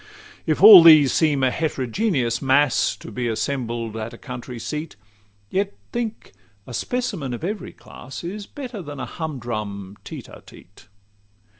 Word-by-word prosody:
XCIV - - -20
If 155 +3 0
all 205 -4 +12
these 155 -5 +7
seem 150 -4 +2
a 130 - +3
heterogeneous 135 - -1
mass 135 0 +2
To - - -11
be 125 -1 -3
assembled 115 -1 -3
at 115 +1 -5
a - - -14
country 125 -1 -8
seat, 150 +7 -5 0.6
Yet 200 +1 -1 0.2
think, 230 -2 -4 0.3
a 125 - -10
specimen 180 - -3
of 120 - -10
every 205 +4 -4
class 130 +6 -11
Is 200 +4 -6
better 250 -8 -7
than 145 -4 -8
a - - -3
humdrum 110 - -5
tete - - -9
a - - -13
tete. 100 +3 -17
140 Hz, 155 wpm, -22 LUFS, 120-175 Hz, 0.6 s, all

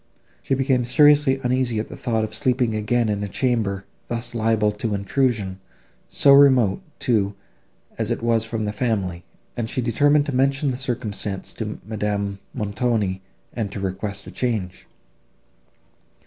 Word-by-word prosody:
She 135 - 0
became 130 -1 +1
seriously 145 +1 +4
uneasy 125 -2 0
at 110 - -2
the - - -9
thought 115 -2 -1
of 110 0 -4
sleeping 125 -2 +1
again 110 +2 +1
in 105 -1 -1
a - - -2
chamber, 105 -3 -1 0.2
thus 120 0 -4
liable 110 -2 +2
to 105 0 -3
intrusion, 100 -2 0 0.5
so 140 - +5
remote, 130 - +5 0.2
too, 105 -4 +1 0.6
as - - 0
it - - -2
was 115 -1 +2
from 115 -1 -3
the 105 - -2
family, 100 -7 -1 0.3
and 115 -2 -3
she - - -2
determined 145 +5 +3
to 145 - -3
mention 135 +2 +2
the - - -3
circumstance 115 -6 -3
to - - -5
Madame 105 -2 -2
Montoni, 105 -3 -1 0.3
and 110 -4 -3
to 100 - -5
request 100 +1 -4
a - - -9
change. 110 -8 -3
115 Hz, 150 wpm, -23 LUFS, 105-125 Hz, 0.6 s, so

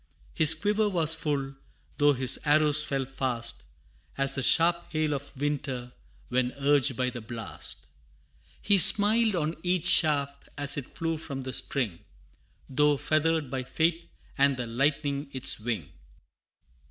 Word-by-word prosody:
His 160 0 +7
quiver 210 +5 0
was 165 -5 +2
full, 145 -4 -3 0.5
though 145 0 +4
his 130 0 +3
arrows 150 0 +3
fell 135 -2 -3
fast 125 - -2 0.5
As 135 0 +1
the 135 - -3
sharp 170 +5 +2
hail 155 -1 -1
of 140 -1 -7
winter 135 -4 -4 0.4
when 125 0 -1
urged 140 -2 +1
by 125 -1 -1
the 120 -1 -8
blast. 115 -1 -9 0.8
He 200 -1 +3
smiled 215 +3 +6
on 160 -1 -3
each 180 -2 -1
shaft 140 -3 +2
as 145 0 +1
it 140 -3 -8
flew 165 -1 -2
from 140 -4 -7
the 130 0 -6
string, 115 - -2 0.7
Though 150 +2 +1
feathered 155 -2 -1
by 130 -1 -3
fate, 165 +5 -2 0.3
and 140 -1 +2
the 125 - -4
lightning 140 +3 -2
its 130 -3 -1
wing. 105 - -4
145 Hz, 140 wpm, -26 LUFS, 130-160 Hz, 0.8 s, His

